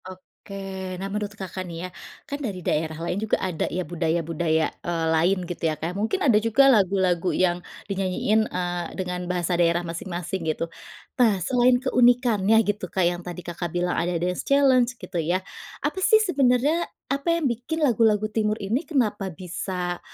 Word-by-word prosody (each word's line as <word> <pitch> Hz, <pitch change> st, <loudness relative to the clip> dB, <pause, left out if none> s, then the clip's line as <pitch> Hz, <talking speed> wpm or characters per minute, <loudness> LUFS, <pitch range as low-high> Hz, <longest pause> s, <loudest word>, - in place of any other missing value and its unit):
Oke, 190 Hz, 0 st, -8 dB
nah 190 Hz, -, -5 dB
menurut 210 Hz, 0 st, -4 dB
Kakak 190 Hz, -1 st, -5 dB
nih 165 Hz, -, -7 dB
ya, -, -, -6 dB, 0.4 s
kan 285 Hz, +1 st, -5 dB
dari 195 Hz, -, -4 dB
daerah 155 Hz, 0 st, 0 dB
lain 180 Hz, +4 st, -2 dB
juga 220 Hz, -, +1 dB
ada 180 Hz, -4 st, -2 dB
ya 180 Hz, +1 st, -3 dB
budaya-budaya, 165 Hz, -1 st, 0 dB
eee, 170 Hz, -1 st, -2 dB
lain 175 Hz, +5 st, +3 dB
gitu 175 Hz, -1 st, -7 dB
ya. 155 Hz, -, -3 dB
Kayak 165 Hz, +4 st, -3 dB
mungkin 220 Hz, -, -1 dB
ada 240 Hz, -6 st, +5 dB
juga 230 Hz, +5 st, +4 dB
lagu-lagu 185 Hz, -3 st, +2 dB
yang 180 Hz, -1 st, +1 dB, 0.2 s
dinyanyiin, 200 Hz, +3 st, 0 dB
eee, 175 Hz, -1 st, -2 dB
dengan 180 Hz, -1 st, -3 dB
bahasa 180 Hz, 0 st, 0 dB
daerah 170 Hz, 0 st, +2 dB
masing-masing 175 Hz, +2 st, -4 dB
gitu. 155 Hz, +1 st, -1 dB, 0.6 s
Nah 220 Hz, -5 st, +5 dB
selain 250 Hz, +1 st, +4 dB
keunikannya 240 Hz, -5 st, +3 dB
gitu, 205 Hz, -3 st, -2 dB
Kak, 185 Hz, -2 st, +1 dB
yang 175 Hz, 0 st, 0 dB
tadi 180 Hz, 0 st, -8 dB
Kakak 175 Hz, 0 st, -4 dB
bilang 175 Hz, +1 st, -1 dB
ada 175 Hz, +1 st, 0 dB
dance 180 Hz, +1 st, -1 dB
challenge 260 Hz, -3 st, +3 dB
gitu 180 Hz, -4 st, -4 dB
ya. 180 Hz, +4 st, -1 dB, 0.4 s
Apa 380 Hz, -, -1 dB
sih 440 Hz, +3 st, +6 dB
sebenarnya 295 Hz, -, +2 dB, 0.2 s
apa 280 Hz, +3 st, -2 dB
yang 335 Hz, -, -2 dB
bikin 255 Hz, +6 st, -2 dB
lagu-lagu 220 Hz, -5 st, +3 dB
Timur 215 Hz, -1 st, +1 dB
ini 225 Hz, -, -2 dB
kenapa 215 Hz, -, 0 dB
bisa 180 Hz, 0 st, -4 dB
190 Hz, 165 wpm, -24 LUFS, 175-230 Hz, 0.6 s, sih